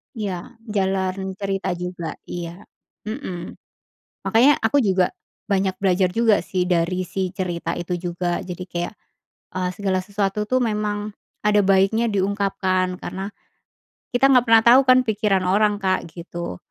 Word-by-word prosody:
Iya, 200 -2 -5 0.2
jalan 190 -1 -1
cerita 195 -2 -2
juga. 180 -2 -5
Iya, 175 +2 -7 0.4
mhm. 210 -7 -6 0.7
Makanya 255 +6 +5
aku 225 +5 +1
juga 185 -2 +3 0.4
banyak 195 -1 +1
belajar 185 -1 +3
juga 225 -2 +3
sih 180 -1 -1
dari 175 +1 +1
si 190 -1 -2
cerita 175 -4 -3
itu 175 +1 -2
juga, 175 +1 -2
jadi 180 0 -6
kayak, 175 +4 -3 0.6
eee, 180 0 0
segala 195 -2 0
sesuatu 200 +2 -2
tuh 255 +2 +1
memang 210 -1 -1 0.3
ada 210 0 +3
baiknya 195 +4 +3
diungkapkan, 195 -2 0
karena, 195 +2 -5 0.8
kita 270 +3 +4
nggak 250 -2 +5
pernah 225 0 +6
tau 250 +3 +8
kan 255 - +8
pikiran 210 -4 +1
orang, 205 +2 +3
Kak, 185 -3 -1
gitu. 170 - -6
195 Hz, 135 wpm, -22 LUFS, 180-210 Hz, 0.8 s, tau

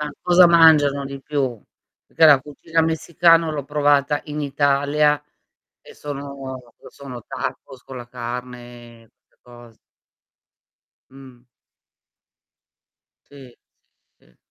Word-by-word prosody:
Ma 150 0 -4
cosa 180 0 +5
mangiano 155 -4 +4
di 140 0 -8
più? 135 -6 -3 0.5
Perché 165 - +1
la 145 -3 +6
cucina 160 +4 -3
messicana 165 0 +2
l'ho 145 -3 -5
provata 145 -1 +1
in 150 0 -6
Italia 145 +1 +1 0.6
e - - -16
sono 140 -2 -8 0.3
sono 125 -4 -11
tacos 130 -2 -7
con 130 - -10
la 120 -1 -10
carne 120 -1 -9
e 115 - -26 0.2
'ste - - -41
cos 120 -2 -17 1.3
Mh. 130 -3 -16 1.9
Sì, 135 -2 -13 0.7
sì, - - -29
sì. - - -30
140 Hz, 110 wpm, -20 LUFS, 125-150 Hz, 1.9 s, la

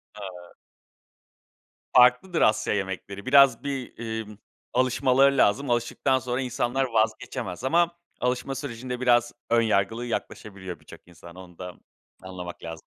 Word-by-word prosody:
Haa. 90 -4 -10 1.4
Farklıdır 125 +9 +5
Asya 105 0 +3
yemekleri. 100 0 -4
Biraz, 135 -2 +5
bir, 135 -3 -5 0.2
imm, 105 -1 -11 0.4
alışmaları 130 +2 +3
lazım. 130 +5 +2
Alıştıktan 120 +3 +1
sonra, 125 +1 -2
insanlar 125 +1 -1
vazgeçemez 110 -3 -2
ama, 170 +5 +3 0.3
alışma 125 +2 -1
sürecinde, 125 -2 -5
biraz 120 -1 +3 0.2
ön 115 0 +4
yargılı 110 +2 0
yaklaşabiliyor 95 -5 -6
birçok - - -15
insan. 85 0 -14
Onu 90 -2 -13
da 90 -1 -7 0.5
anlamak 90 -2 -8
lazım. 80 -1 -7
120 Hz, 120 wpm, -26 LUFS, 95-130 Hz, 1.4 s, Farklıdır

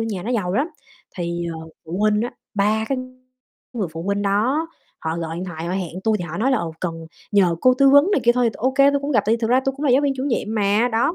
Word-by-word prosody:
nhà 215 -5 -3
nó 225 - -4
giàu 185 -6 -1
lắm, 285 +8 +1 0.5
thì, 170 -1 -3
ờ, 160 0 -9 0.2
phụ 170 +4 -5
huynh 210 0 +2
á, 240 - -2 0.2
3 210 +2 +1
cái 270 -2 0 0.7
người 215 -7 -2
phụ 165 - -6
huynh 200 +2 -1
đó, 235 +11 +1 0.3
họ 160 +1 -2
gọi 165 -1 -4
điện 180 - -4
thoại 165 -3 -6
họ 175 - -2
hẹn 185 -1 -4
tui, 220 -1 +3
thì 175 - -4
họ 160 0 -6
nói 250 +5 +2
là 260 - +2
"Ờ, 165 -5 -3
cần 165 -2 -4 0.3
nhờ 180 -5 +3
cô 255 0 +5
tư 275 +1 +5
vấn" 285 +7 +6
này 275 - +3
kia 240 - +6
thôi, 245 -1 +2
thì - - -18
ô 255 +4 0
kê 275 +1 +5
tui 280 - 0
cũng 285 +1 -3
gặp, - - +3
tại 220 - +3
vì - - 0
thực 225 0 -1
ra 255 +1 +4
tôi 270 0 0
cũng 295 - -5
là 270 - +3
giáo 270 - +4
viên 280 -1 +2
chủ 260 - -3
nhiệm 230 -4 -1
mà, 210 +3 +2
đó. 235 +9 +1
215 Hz, 290 wpm, -21 LUFS, 180-260 Hz, 0.7 s, vấn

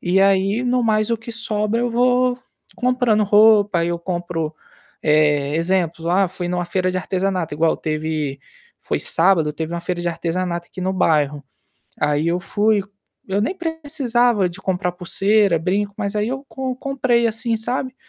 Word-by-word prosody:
E 185 +2 +2
aí, 195 +4 +3
no 250 0 +1
mais, 215 0 +1
o 230 - +2
que 225 +1 -9
sobra 220 -1 -1
eu 245 - 0
vou 250 +1 +2 0.4
comprando 245 -4 +2
roupa, 205 -2 +5
aí 170 +1 0
eu 170 0 -2
compro, 170 -3 -3 0.5
eh, 150 -1 +2
exemplos, 170 -1 0
ah, 185 +2 +3
fui 180 -1 -5
em 175 - -3
uma 180 0 -1
feira 185 +1 0
de 185 - -2
artesanato, 185 -3 -2
igual 160 +2 +2
teve, 155 -3 -3 0.4
foi - - -1
sábado, 165 -3 +2
teve 160 +2 -4
uma 170 - -3
feira 180 0 -3
de 175 - 0
artesanato 170 +1 -3
aqui 185 - -9
no 190 +1 0
bairro. 150 -5 +1 0.6
Aí 150 +2 +1
eu 175 +1 +1
fui 205 +2 +1 0.5
eu 195 +1 0
nem 235 - -1
precisava 265 - 0
de 175 +2 -11
comprar 180 -1 -1
pulseira, 195 +1 +2
brinco, 200 +4 -1
mas 200 +1 -2
aí 210 +1 0
eu 270 +2 -4
com 260 -1 -4
comprei, 255 -3 +1
assim, 225 +1 -1
sabe, 255 +3 -3
190 Hz, 175 wpm, -20 LUFS, 170-230 Hz, 0.6 s, roupa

